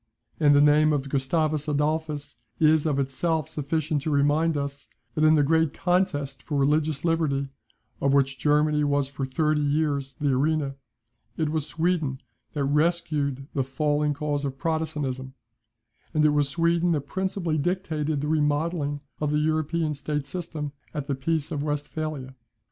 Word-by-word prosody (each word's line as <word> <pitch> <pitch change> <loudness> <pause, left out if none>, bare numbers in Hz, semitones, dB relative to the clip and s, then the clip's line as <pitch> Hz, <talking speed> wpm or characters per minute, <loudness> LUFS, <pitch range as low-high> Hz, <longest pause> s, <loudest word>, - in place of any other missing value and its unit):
And 145 -2 +5
the 145 - +6
name 150 +1 +5
of 140 -1 -1
Gustavus 150 +2 0
Adolphus 150 0 -1 0.2
is 155 0 +4
of 145 -3 +1
itself 140 +3 0
sufficient 150 0 -1
to 155 - -2
remind 150 +2 +2
us, 140 0 -5 0.3
that 155 - 0
in 155 0 +6
the 150 - +4
great 160 +1 +2
contest 145 -7 0
for 145 - -3
religious 150 +2 +1
liberty, 150 -5 +1 0.5
of 140 - +3
which 135 -1 +2
Germany 150 +2 +3
was 145 -1 +1
for 135 -1 -4
thirty 150 +3 +1
years 145 -2 0
the 145 -2 +1
arena, 140 +1 +1 0.6
it 155 -2 0
was 155 -1 -2
Sweden 160 -6 0 0.3
that 145 - -1
rescued 150 -2 0
the 135 - +1
falling 145 +2 0
cause 145 0 -2
of 135 -1 -3
Protestantism; 145 -5 -2 0.8
and 155 0 +4
it - - +6
was 145 -1 +2
Sweden 170 +3 +2
that 150 - 0
principally 175 0 -2
dictated 155 -3 -1
the 150 - -2
remodelling 150 -1 0 0.2
of 150 - 0
the 150 - +1
European 155 +1 0
state 145 0 -3
system 155 -2 -5 0.2
at 145 -2 -2
the 140 - -1
peace 145 +3 -1
of 145 - -2
Westphalia. 145 -2 -3
150 Hz, 155 wpm, -26 LUFS, 140-155 Hz, 0.8 s, the